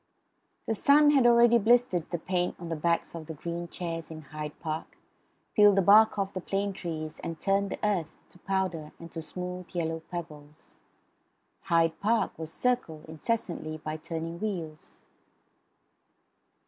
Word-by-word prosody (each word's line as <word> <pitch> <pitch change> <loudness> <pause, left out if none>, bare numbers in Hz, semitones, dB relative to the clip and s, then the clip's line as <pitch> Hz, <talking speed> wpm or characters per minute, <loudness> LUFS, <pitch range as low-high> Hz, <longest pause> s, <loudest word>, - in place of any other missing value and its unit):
The - - 0
sun 290 +6 +5
had 270 -4 +5
already 235 0 +6
blistered 225 -6 +3
the 175 - -2
paint 180 +1 -1
on 170 -1 -7
the 165 - -1
backs 170 +2 0
of 165 -2 -7
the 160 - -6
green 170 +2 -5
chairs 165 -1 -5
in 155 -1 -8
Hyde 150 0 -7
Park; 155 0 -5 0.6
peeled 205 -2 +6
the 195 - +3
bark 215 +3 +6
off 195 -1 -1
the 185 - -4
plane 200 +2 -1
trees; 160 -4 -5
and 165 -1 -5
turned 200 0 +1
the - - -4
earth 180 -7 0 0.2
to 180 - -20
powder 185 -5 -2
and 165 -1 -11
to 165 - -5
smooth 180 +2 -6
yellow 165 -1 -1
pebbles. 150 -4 -9 0.9
Hyde 165 -3 +2
Park 220 0 +1
was 160 -1 -5
circled, 240 -10 -1
incessantly, 160 -2 -3
by 155 0 -5
turning 165 +1 -5
wheels. 170 -8 -5
170 Hz, 155 wpm, -29 LUFS, 160-200 Hz, 0.9 s, already